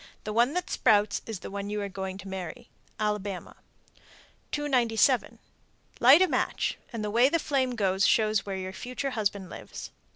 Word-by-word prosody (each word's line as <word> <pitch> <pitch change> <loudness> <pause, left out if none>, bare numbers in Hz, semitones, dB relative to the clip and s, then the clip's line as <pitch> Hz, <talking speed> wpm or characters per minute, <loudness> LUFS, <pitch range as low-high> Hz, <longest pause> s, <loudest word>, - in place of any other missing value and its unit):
The 215 - -4
one 240 +7 +3
that 360 0 -1
sprouts 205 -1 +3
is 220 -5 -5
the - - -7
one 200 0 -4
you 210 0 -2
are - - -2
going 190 -1 -5
to 195 0 -10
marry. 190 -3 -7 0.3
Alabama. 210 -3 -3 0.9
297. 255 -3 +2 0.6
Light 275 +9 +8
a - - +3
match, - - -1
and 230 -3 -4
the 210 - -2
way 240 +4 +5
the 335 - +2
flame 265 -5 0
goes 195 -3 +2
shows 215 -2 +3
where 195 -1 -4
your 185 0 -5
future 255 +5 -4
husband 200 -5 -2
lives. - - -8
215 Hz, 170 wpm, -28 LUFS, 195-250 Hz, 0.9 s, Light